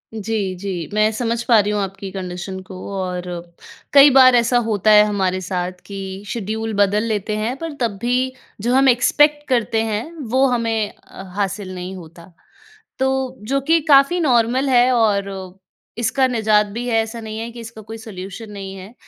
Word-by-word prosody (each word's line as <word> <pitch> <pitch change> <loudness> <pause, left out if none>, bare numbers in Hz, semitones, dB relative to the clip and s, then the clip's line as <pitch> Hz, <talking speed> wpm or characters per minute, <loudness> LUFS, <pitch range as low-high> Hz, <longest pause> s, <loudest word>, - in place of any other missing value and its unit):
जी, 205 -3 -2
जी। 180 -3 -5
मैं 215 +1 +3
समझ 230 +1 -1
पा 230 -3 +5
रही 205 +1 +1
हूँ 205 -1 0
आपकी 195 0 -5
कंडीशन 185 0 -6
को 190 - -8 0.2
और 180 -1 -3 0.7
कई 280 +1 +9
बार 255 -1 +7
ऐसा 240 +1 +3
होता 215 0 +2
है 210 0 +8
हमारे 190 -3 0
साथ 180 0 -3
कि 195 0 -7
शेड्यूल 220 +1 -3
बदल 205 +2 +2
लेते 215 -1 -2
हैं 225 +4 -2
पर 330 -1 -5
तब 220 -4 -1
भी 250 +2 0 0.3
जो 240 +4 0
हम 270 0 +5
एक्सपेक्ट 295 +4 +3
करते 230 -3 +1
हैं 220 0 -2 0.3
वो 260 +2 +3
हमें 225 -4 0
अ, 190 - -13
हासिल 195 -1 -3
नहीं 180 +1 -6
होता। 170 -1 -12 0.7
तो 265 -1 -1
जो 275 +2 +1
कि 325 +4 +3
काफ़ी 280 +5 +5
नॉर्मल 255 -2 +2
है 250 0 +4
और 205 -4 +2 0.7
इसका 260 +3 +2
निजात 220 -3 +2
भी 235 +4 -6
है, 230 - 0
ऐसा 225 +1 -7
नहीं 220 0 -6
है 230 +1 -5
कि 235 - -11
इसका 225 -1 -10
कोई 225 +2 -9
सॉल्यूशन 210 0 -9
नहीं 195 -1 -7
है। 195 +4 -11
220 Hz, 180 wpm, -20 LUFS, 195-245 Hz, 0.7 s, कई